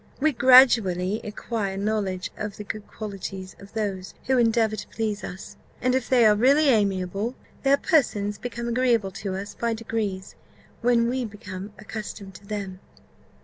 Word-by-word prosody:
We 310 Hz, +3 st, +3 dB
gradually 225 Hz, -7 st, +5 dB
acquire 210 Hz, -2 st, -3 dB
knowledge 200 Hz, -2 st, -1 dB
of 210 Hz, -2 st, -5 dB
the 210 Hz, -, -6 dB
good 210 Hz, 0 st, -6 dB
qualities 195 Hz, -3 st, -7 dB
of 200 Hz, 0 st, -14 dB
those 200 Hz, -4 st, -3 dB
who 260 Hz, 0 st, +3 dB
endeavour 225 Hz, -2 st, +3 dB
to 205 Hz, -, -7 dB
please 215 Hz, -2 st, -3 dB
us; 185 Hz, +2 st, -8 dB, 0.2 s
and 255 Hz, 0 st, +1 dB
if 260 Hz, -1 st, 0 dB
they 245 Hz, -3 st, +5 dB
are 215 Hz, -, +7 dB
really 275 Hz, +7 st, +4 dB
amiable, 200 Hz, 0 st, +1 dB, 0.3 s
their 275 Hz, 0 st, +4 dB
persons 210 Hz, -, +1 dB
become 240 Hz, -1 st, -5 dB
agreeable 235 Hz, -4 st, +2 dB
to 195 Hz, -2 st, -3 dB
us 200 Hz, +2 st, -6 dB
by 230 Hz, -1 st, -1 dB
degrees, 215 Hz, -4 st, -3 dB, 0.5 s
when 235 Hz, -1 st, +3 dB
we 255 Hz, +1 st, -1 dB
become 200 Hz, -2 st, -7 dB
accustomed 210 Hz, -2 st, -7 dB
to 200 Hz, +2 st, -14 dB
them." 195 Hz, -3 st, -5 dB
215 Hz, 155 wpm, -25 LUFS, 195-235 Hz, 0.5 s, are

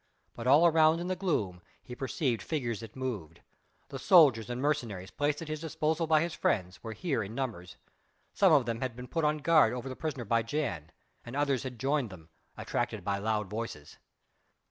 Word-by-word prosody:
But 120 Hz, +1 st, -6 dB
all 145 Hz, +6 st, +6 dB
around 160 Hz, -1 st, +5 dB
in 175 Hz, +1 st, -4 dB
the 185 Hz, -, 0 dB
gloom 105 Hz, -, -1 dB, 0.2 s
he 125 Hz, -, -9 dB
perceived 130 Hz, -3 st, -1 dB
figures 120 Hz, -2 st, -2 dB
that 115 Hz, -2 st, -10 dB
moved; 105 Hz, -12 st, -5 dB, 0.5 s
the 135 Hz, -, -6 dB
soldiers 135 Hz, -, +5 dB
and 120 Hz, 0 st, -3 dB
mercenaries 120 Hz, -10 st, -2 dB
placed 145 Hz, +2 st, -1 dB
at -, -, -9 dB
his 155 Hz, -1 st, -4 dB
disposal 160 Hz, 0 st, -1 dB
by 155 Hz, -1 st, +4 dB
his 170 Hz, 0 st, -2 dB
friends 90 Hz, -3 st, -1 dB
were 115 Hz, -1 st, -5 dB
here 140 Hz, -3 st, -1 dB
in 105 Hz, +2 st, -6 dB
numbers: 110 Hz, -10 st, -4 dB, 0.6 s
some 195 Hz, -3 st, +4 dB
of 145 Hz, -5 st, +5 dB
them 115 Hz, -1 st, -3 dB
had 130 Hz, -3 st, -3 dB
been 125 Hz, +1 st, -8 dB
put 165 Hz, +3 st, -2 dB
on 150 Hz, 0 st, +2 dB
guard 155 Hz, -6 st, +4 dB
over 125 Hz, +1 st, -5 dB
the 130 Hz, -, -5 dB
prisoner 140 Hz, -6 st, -4 dB
by 115 Hz, +2 st, +2 dB
Jan, 115 Hz, -, -3 dB, 0.3 s
and 120 Hz, +2 st, -8 dB
others 140 Hz, -3 st, +1 dB
had 125 Hz, -3 st, -7 dB
joined 135 Hz, -2 st, 0 dB
them, 85 Hz, -4 st, -13 dB, 0.3 s
attracted 120 Hz, -5 st, -3 dB
by 100 Hz, +1 st, -1 dB
loud 105 Hz, 0 st, -1 dB
voices. 105 Hz, -8 st, -6 dB
125 Hz, 195 wpm, -30 LUFS, 110-150 Hz, 0.6 s, all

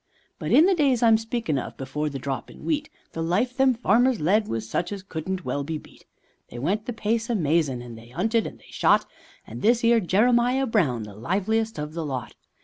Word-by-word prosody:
But -, -, -3 dB
in 315 Hz, -, +7 dB
the 385 Hz, -, +4 dB
days 275 Hz, -8 st, +2 dB
I'm 225 Hz, -1 st, +6 dB
speakin' 225 Hz, -, -2 dB
of, -, -, -7 dB
before 150 Hz, +3 st, -3 dB
the 140 Hz, -, -5 dB
drop 135 Hz, 0 st, -4 dB
in -, -, -13 dB
wheat, 305 Hz, -1 st, -1 dB, 0.2 s
The 165 Hz, -, -5 dB
life 205 Hz, +10 st, 0 dB
them 265 Hz, -1 st, +3 dB
farmers 240 Hz, +2 st, +3 dB
led 205 Hz, +7 st, +2 dB
was 115 Hz, -1 st, -3 dB
such 175 Hz, -, -2 dB
as 200 Hz, -2 st, -5 dB
couldn't 185 Hz, +1 st, -5 dB
well 140 Hz, -, -2 dB
be 160 Hz, +2 st, -3 dB
beat; -, -, -16 dB, 0.4 s
They -, -, -9 dB
went 195 Hz, -, -1 dB
the -, -, -1 dB
pace 225 Hz, +1 st, -1 dB
amazin', 145 Hz, -, 0 dB
they 115 Hz, +1 st, -13 dB
'unted 220 Hz, -, 0 dB
and -, -, -10 dB
they -, -, -19 dB
shot, -, -, +3 dB, 0.4 s
And 115 Hz, +2 st, -9 dB
this 235 Hz, +2 st, +3 dB
'ere 230 Hz, 0 st, +5 dB
Jeremiah 240 Hz, +7 st, +3 dB
Brown 160 Hz, -, +1 dB
the 105 Hz, -1 st, -9 dB
liveliest 205 Hz, -, -1 dB
of 150 Hz, +1 st, -5 dB
the 165 Hz, 0 st, -3 dB
lot. 130 Hz, -5 st, -4 dB
195 Hz, 210 wpm, -25 LUFS, 145-235 Hz, 0.4 s, in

